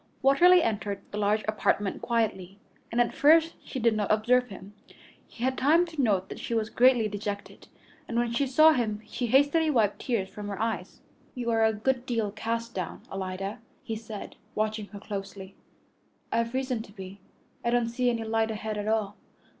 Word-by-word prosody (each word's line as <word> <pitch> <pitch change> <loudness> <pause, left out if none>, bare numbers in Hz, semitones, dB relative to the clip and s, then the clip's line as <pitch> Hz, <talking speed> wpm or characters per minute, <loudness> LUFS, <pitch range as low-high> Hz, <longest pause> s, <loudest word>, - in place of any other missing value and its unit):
Watterly 345 +6 +6
entered 205 -2 -2
the 210 - -4
large 210 +1 +1
apartment 205 -2 0
quietly, 200 -5 -1 0.3
and 235 - 0
at 240 - +2
first 325 +3 +5
she - - -7
did 230 -2 +3
not 210 -2 0
observe 245 +4 +3
him. 195 -1 -11 0.5
He 235 - -9
had 260 +1 +1
time 320 +6 +4
to 320 -4 -3
note 195 -6 +1
that - - -7
she 235 - -3
was 220 -1 -1
greatly 245 -3 +4
dejected, 205 0 -6 0.4
and 235 - -3
when 240 0 +1
she 275 +4 +1
saw 310 +5 +6
him 220 -6 -1
she 245 - -3
hastily 285 +6 +3
wiped 220 -8 +2
tears 225 -7 -1
from 205 +1 -8
her 200 -1 -5
eyes. 225 0 -3 0.3
"You 240 -2 -2
are 225 0 +3
a 220 - +4
good 250 +4 -1
deal 225 -4 -1
cast 230 +2 -3
down, 185 -3 -5
Alida," 195 +1 -4 0.2
he 225 -4 -4
said, 215 -2 -8 0.2
watching 215 -1 -1
her 205 - -10
closely. 195 -1 -7 0.8
"I've 230 +2 0
reason 255 -3 -1
to 220 - -12
be. 195 -1 -10 0.4
I 235 - +1
don't 240 -1 +2
see 245 +1 +1
any 230 -2 -1
light 225 0 0
ahead 215 -1 -4
at 205 - -4
all." 215 -2 0
225 Hz, 185 wpm, -28 LUFS, 205-250 Hz, 0.8 s, Watterly